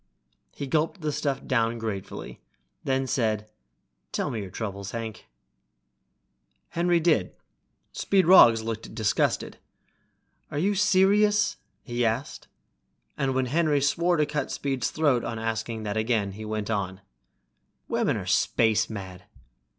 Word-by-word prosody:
He 140 Hz, -, -4 dB
gulped 160 Hz, +6 st, 0 dB
the 155 Hz, -1 st, -1 dB
stuff 140 Hz, -2 st, -2 dB
down 115 Hz, -2 st, +1 dB
gratefully, 110 Hz, -4 st, -6 dB, 0.4 s
then 135 Hz, 0 st, 0 dB
said, 110 Hz, -4 st, -1 dB, 0.6 s
"Tell -, -, -2 dB
me 110 Hz, -, -3 dB
your 95 Hz, -, -7 dB
troubles, 100 Hz, -1 st, -5 dB
Hank." 115 Hz, -1 st, -6 dB, 1.4 s
Henry 175 Hz, 0 st, +2 dB
did. 155 Hz, -, +1 dB, 0.6 s
Speed 195 Hz, -2 st, +2 dB
Roggs 115 Hz, -11 st, +7 dB
looked 110 Hz, -1 st, -5 dB
disgusted. 110 Hz, -3 st, 0 dB, 0.9 s
"Are 150 Hz, -, -5 dB
you 195 Hz, +7 st, +2 dB
serious?" 205 Hz, +1 st, +3 dB, 0.3 s
he 120 Hz, 0 st, -2 dB
asked, 115 Hz, +4 st, -2 dB, 0.7 s
and 135 Hz, -1 st, -1 dB
when 130 Hz, 0 st, +1 dB
Henry 150 Hz, +2 st, +2 dB
swore 170 Hz, +5 st, +2 dB
to 150 Hz, -, +3 dB
cut 150 Hz, 0 st, -3 dB
Speed's 135 Hz, -3 st, -2 dB
throat 145 Hz, -6 st, +1 dB
on 115 Hz, -1 st, -4 dB
asking 115 Hz, 0 st, -3 dB
that 105 Hz, 0 st, -3 dB
again, 110 Hz, -3 st, 0 dB
went 110 Hz, 0 st, -3 dB
on, 95 Hz, -2 st, -2 dB, 0.9 s
"Women -, -, 0 dB
are -, -, -5 dB
space 110 Hz, -1 st, +2 dB
mad!" 95 Hz, -4 st, -8 dB
120 Hz, 125 wpm, -26 LUFS, 110-150 Hz, 1.4 s, Roggs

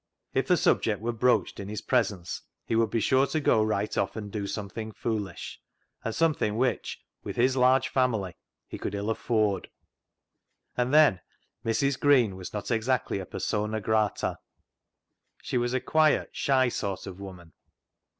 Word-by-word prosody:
If -, -, +1 dB
the -, -, +4 dB
subject 105 Hz, -4 st, +2 dB
were 115 Hz, +3 st, -2 dB
broached 125 Hz, +2 st, +1 dB
in 100 Hz, -, -6 dB
his 105 Hz, -1 st, -5 dB
presence 100 Hz, -8 st, 0 dB, 0.2 s
he -, -, -1 dB
would 115 Hz, -1 st, +3 dB
be 115 Hz, -, 0 dB
sure 130 Hz, +4 st, +3 dB
to 155 Hz, -, -1 dB
go 115 Hz, -6 st, +3 dB
right 105 Hz, -1 st, -1 dB
off 95 Hz, -, 0 dB
and 105 Hz, -2 st, -6 dB
do 100 Hz, -2 st, -3 dB
something 110 Hz, +2 st, -5 dB
foolish, 105 Hz, -4 st, -4 dB, 0.4 s
and 115 Hz, -, -3 dB
something 155 Hz, -10 st, +1 dB
which, 125 Hz, 0 st, -1 dB, 0.2 s
with -, -, -5 dB
his 130 Hz, +2 st, +3 dB
large 130 Hz, 0 st, +4 dB
family, 110 Hz, -9 st, 0 dB, 0.3 s
he -, -, -7 dB
could -, -, -3 dB
ill 100 Hz, +2 st, -1 dB
afford. 110 Hz, -4 st, 0 dB, 1.1 s
And 125 Hz, +1 st, 0 dB
then 150 Hz, -, +5 dB, 0.4 s
Mrs. 135 Hz, +4 st, +1 dB
Green 125 Hz, -9 st, +4 dB
was 95 Hz, -1 st, -8 dB
not 105 Hz, +3 st, -4 dB
exactly 115 Hz, -2 st, 0 dB
a 95 Hz, -, -7 dB
persona 105 Hz, +1 st, -2 dB
grata. 110 Hz, 0 st, 0 dB, 1.0 s
She 125 Hz, -, -1 dB
was 120 Hz, 0 st, 0 dB
a -, -, +2 dB
quiet, 155 Hz, +3 st, +2 dB
shy 130 Hz, -2 st, +2 dB
sort 100 Hz, -5 st, -3 dB
of 95 Hz, -1 st, -8 dB
woman. 90 Hz, -5 st, -10 dB
110 Hz, 160 wpm, -28 LUFS, 100-125 Hz, 1.1 s, then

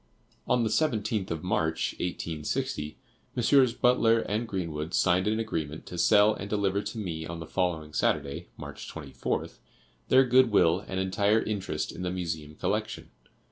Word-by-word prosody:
On 125 Hz, -, +3 dB
the 110 Hz, -, +1 dB
17th 110 Hz, -7 st, 0 dB
of 80 Hz, -2 st, -4 dB
March, 80 Hz, -3 st, 0 dB
1860, 75 Hz, -3 st, -3 dB, 0.4 s
Messrs. 125 Hz, 0 st, +4 dB
Butler 115 Hz, -2 st, +3 dB, 0.2 s
& 120 Hz, -, -5 dB
Greenwood 85 Hz, -5 st, -3 dB
signed 90 Hz, +2 st, +3 dB
an 110 Hz, +1 st, +1 dB
agreement 80 Hz, -9 st, -3 dB
to 90 Hz, -, -8 dB
sell 105 Hz, +4 st, +5 dB
and 100 Hz, -1 st, -7 dB
deliver 100 Hz, -1 st, +1 dB
to 115 Hz, -, -6 dB
me 80 Hz, -6 st, -4 dB
on 85 Hz, 0 st, -6 dB
the 80 Hz, -, -6 dB
following 80 Hz, -3 st, -2 dB
Saturday, 70 Hz, -2 st, 0 dB
March -, -, -8 dB
24th, -, -, -4 dB, 0.5 s
their 130 Hz, +1 st, +6 dB
good 130 Hz, 0 st, +5 dB
will 90 Hz, -4 st, +4 dB
and 95 Hz, -, -3 dB
entire 100 Hz, +3 st, +2 dB
interest 105 Hz, -3 st, -3 dB
in -, -, -8 dB
the 90 Hz, -, -1 dB
Museum 80 Hz, -4 st, -4 dB
collection. -, -, -3 dB
95 Hz, 155 wpm, -28 LUFS, 80-110 Hz, 0.5 s, their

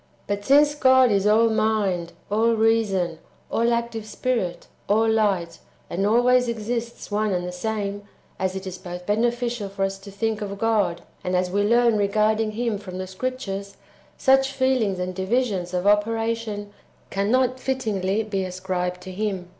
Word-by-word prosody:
But 200 Hz, 0 st, -3 dB
since 290 Hz, +4 st, +5 dB
God 260 Hz, -3 st, +5 dB
is^ 200 Hz, +1 st, +3 dB
all 225 Hz, +1 st, +4 dB
mind, 200 Hz, -6 st, 0 dB, 0.2 s
all 225 Hz, +2 st, +3 dB
reason, 210 Hz, -7 st, +1 dB, 0.3 s
all 235 Hz, +1 st, +2 dB
active 235 Hz, -2 st, -2 dB
spirit, 215 Hz, -5 st, -2 dB, 0.2 s
all 220 Hz, +2 st, +3 dB
light, 195 Hz, -7 st, +1 dB, 0.3 s
and 195 Hz, +3 st, 0 dB
always 245 Hz, +3 st, +4 dB
exists 235 Hz, 0 st, -4 dB
one 210 Hz, 0 st, +1 dB
and 180 Hz, -1 st, -1 dB
the 180 Hz, -, -4 dB
same, 205 Hz, +1 st, -3 dB, 0.4 s
as 190 Hz, 0 st, -1 dB
it 190 Hz, 0 st, -5 dB
is 185 Hz, -1 st, -6 dB
both 180 Hz, 0 st, -8 dB
beneficial 235 Hz, 0 st, 0 dB
for 195 Hz, 0 st, -3 dB
us 195 Hz, 0 st, -4 dB
to 195 Hz, +1 st, -11 dB
think 215 Hz, +2 st, -2 dB
of 200 Hz, -1 st, -4 dB
God, 200 Hz, -6 st, +1 dB, 0.2 s
and 180 Hz, 0 st, -1 dB
as 180 Hz, 0 st, 0 dB
we 200 Hz, +2 st, +1 dB
learn 230 Hz, +1 st, +3 dB
re 200 Hz, -, +2 dB
garding 215 Hz, +1 st, +1 dB
Him 230 Hz, -2 st, -1 dB
from 185 Hz, -3 st, -8 dB
the 185 Hz, -, -3 dB
Scriptures, 200 Hz, -1 st, -5 dB, 0.4 s
such 270 Hz, 0 st, +3 dB
feelings 260 Hz, -7 st, +1 dB
and 180 Hz, 0 st, -3 dB
divisions 190 Hz, -2 st, -1 dB
[of 180 Hz, 0 st, -2 dB
operation] 215 Hz, 0 st, 0 dB, 0.4 s
cannot 250 Hz, +6 st, +1 dB
fittingly 220 Hz, -6 st, -1 dB
be 200 Hz, -3 st, -2 dB
ascribed 180 Hz, -1 st, -3 dB
to 185 Hz, -, -8 dB
Him. 190 Hz, -2 st, -3 dB
210 Hz, 160 wpm, -24 LUFS, 190-230 Hz, 0.4 s, since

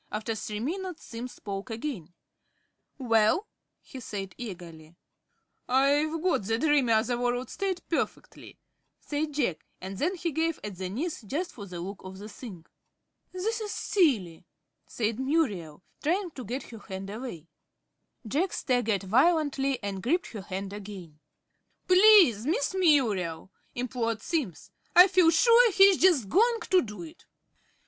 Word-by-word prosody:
After 215 Hz, +2 st, -3 dB
three 210 Hz, -1 st, -5 dB
minutes 355 Hz, -, -4 dB
Simms 240 Hz, +2 st, -7 dB
spoke 200 Hz, +2 st, -7 dB
again. 225 Hz, -, -5 dB, 0.9 s
"Well?" 230 Hz, -, +2 dB, 0.4 s
he 265 Hz, -, -10 dB
said, 195 Hz, -5 st, -6 dB
eagerly. 170 Hz, -7 st, -9 dB, 0.7 s
"I've 290 Hz, +5 st, +2 dB
got 365 Hz, -, +2 dB
the 225 Hz, +3 st, -1 dB
dreamy, 285 Hz, -3 st, +2 dB
other 225 Hz, +2 st, +2 dB
world 245 Hz, +1 st, -1 dB
state 385 Hz, -2 st, -3 dB
perfectly," 330 Hz, -, -4 dB, 0.4 s
said 295 Hz, 0 st, -3 dB
Jack, 240 Hz, -, -1 dB, 0.2 s
and 190 Hz, +1 st, -7 dB
then 355 Hz, +6 st, 0 dB
he 340 Hz, -1 st, -3 dB
gave 320 Hz, +2 st, -1 dB
at 205 Hz, -3 st, -6 dB
the 185 Hz, -1 st, -3 dB
knees, 300 Hz, -, -4 dB
just 290 Hz, -, -4 dB
for 205 Hz, -4 st, -10 dB
the 180 Hz, -2 st, -7 dB
look 195 Hz, +3 st, -7 dB
of 190 Hz, 0 st, -9 dB
the 205 Hz, +2 st, -9 dB
thing. 205 Hz, -6 st, -10 dB, 0.7 s
"This 440 Hz, +5 st, -2 dB
is 420 Hz, -1 st, -4 dB
silly," 225 Hz, -, +1 dB, 0.4 s
said 225 Hz, 0 st, -2 dB
Muriel, 210 Hz, -, -1 dB, 0.2 s
trying 355 Hz, +3 st, 0 dB
to 255 Hz, -5 st, -9 dB
get 255 Hz, +4 st, -4 dB
her 225 Hz, -, -9 dB
hand 195 Hz, 0 st, -7 dB
away. 210 Hz, -, -7 dB, 0.8 s
Jack 320 Hz, -, 0 dB
staggered 230 Hz, -7 st, 0 dB
violently, 275 Hz, -, +2 dB
and 195 Hz, -2 st, -4 dB
gripped 325 Hz, -, 0 dB
her 215 Hz, -, -6 dB
hand 195 Hz, +1 st, -6 dB
again. 190 Hz, -7 st, -9 dB, 0.7 s
"Please, 365 Hz, -, +6 dB
Miss 305 Hz, 0 st, 0 dB
Muriel," 215 Hz, -, +1 dB, 0.2 s
implored 235 Hz, -3 st, -2 dB
Simms. 275 Hz, -, -3 dB, 0.2 s
"I 360 Hz, +2 st, +10 dB
feel 365 Hz, -3 st, +4 dB
sure 465 Hz, +7 st, +5 dB
he 390 Hz, -, +5 dB
is 370 Hz, -, 0 dB
just 330 Hz, -, +4 dB
going 455 Hz, -, +3 dB
to 370 Hz, -1 st, +6 dB
do 210 Hz, +5 st, -7 dB
it." 325 Hz, 0 st, -13 dB
245 Hz, 145 wpm, -28 LUFS, 200-330 Hz, 0.9 s, I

